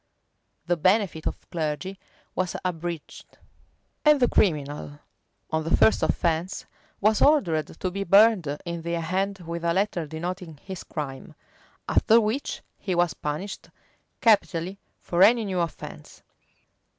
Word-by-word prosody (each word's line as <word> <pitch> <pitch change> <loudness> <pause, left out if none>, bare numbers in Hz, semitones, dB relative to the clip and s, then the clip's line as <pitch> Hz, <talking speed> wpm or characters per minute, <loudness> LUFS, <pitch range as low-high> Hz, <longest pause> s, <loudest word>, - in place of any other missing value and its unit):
[] - - -48
The 175 0 +1
benefit 185 -1 +2
of - - -5
clergy 165 +4 -3 0.3
was 185 -1 -2
abridged;[] 170 -2 -5 0.7
and 300 -1 +6
the 245 - +4
criminal, 145 -6 0 0.5
on 160 0 0
the 165 - +2
first 220 - +4
offence, 170 +3 0 0.3
was 215 +1 +3
ordered 180 - +3
to 185 - -2
be 200 +2 -3
burned 200 -2 +5 0.2
in 170 -1 -4
the 170 +1 -2
hand 190 +4 -2
with 170 +1 -5
a 170 0 +1
letter 190 -5 0
denoting 170 +1 -5
his 190 -2 -7
crime; 135 -3 -6 0.5
after 225 +1 +5
which 225 +6 -2 0.2
he 185 -3 -2
was 175 -1 +2
punished 155 +7 -5 0.5
capitally 195 -4 +2 0.2
for 175 +1 -1
any 225 +3 +6
new 190 -2 -2
offence. 170 -2 -6
175 Hz, 135 wpm, -26 LUFS, 165-200 Hz, 0.7 s, and